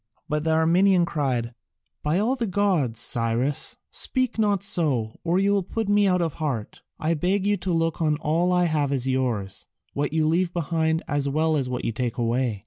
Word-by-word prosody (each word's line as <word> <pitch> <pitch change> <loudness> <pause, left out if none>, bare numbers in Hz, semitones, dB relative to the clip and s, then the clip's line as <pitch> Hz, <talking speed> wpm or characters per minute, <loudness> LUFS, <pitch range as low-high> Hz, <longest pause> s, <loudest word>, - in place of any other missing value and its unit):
But 150 0 -1
the 160 - -1
Armenian 175 +3 +3
cried, 130 -8 -2 0.5
"By 150 +3 0
all 225 +7 +1
the 235 -4 -2
gods, 180 - 0
Cyrus, 120 +4 0
speak 255 -3 0
not 205 -3 +2
so, 135 - +1
or 175 +1 +1
you 195 +1 +2
will 200 -1 +2
put 210 +3 -4
me 205 0 +4
out 180 -2 +2
of 165 -3 -2
heart. 130 -9 -3 0.2
I 160 +2 0
beg 185 +5 0
you 205 0 +2
to 180 0 -3
look 165 0 0
on 155 -2 +1
all 165 +4 0
I 180 0 +3
have 150 -4 0
as 135 -2 0
yours, 125 -7 -2 0.3
what 145 0 -1
you 160 0 +1
leave 170 +2 +1
behind 160 -1 0
as 145 -1 0
well 155 +2 +1
as 135 -4 -1
what 125 -1 -4
you - - 0
take 120 0 -3
away." 120 -2 0
160 Hz, 200 wpm, -24 LUFS, 130-180 Hz, 0.5 s, me